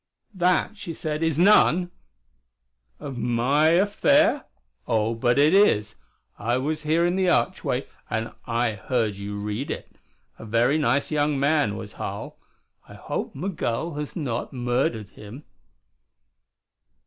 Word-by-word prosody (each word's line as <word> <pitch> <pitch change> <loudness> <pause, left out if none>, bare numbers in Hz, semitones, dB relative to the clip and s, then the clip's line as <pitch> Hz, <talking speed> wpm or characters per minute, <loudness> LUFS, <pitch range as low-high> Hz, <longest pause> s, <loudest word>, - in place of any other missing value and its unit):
"That," 185 +3 +1
she 170 - -6
said, 155 0 -3
"is 160 -3 0
none 180 -2 +4 0.5
" - - -41
"Of 135 -4 -6
my 125 +6 +2
affair? 280 - +3 0.4
Oh, 115 -1 +1
but 120 +2 +1
it 150 +4 +5
is. 110 - +4 0.5
I 120 +4 0
was 155 +4 -2
here 160 +3 +2
in 175 +1 +1
the 190 -1 +2
archway 120 -9 0 0.2
and 110 0 -2 0.2
I 120 0 +1
heard 110 +1 -1
you 100 +1 -6
read 105 +6 -4
it. - - -6 0.4
A - - -9
very 120 +7 +2
nice 140 +1 +1
young 145 -2 +1
man, 140 -7 +2
was 105 - -8
Harl. - - -6 0.5
I - - -11
hope - - -5
Migul 160 -2 -3
has 150 0 -6
not 130 -8 -3
murdered 120 -3 -1
him." 110 +8 -11
135 Hz, 135 wpm, -24 LUFS, 115-160 Hz, 0.5 s, it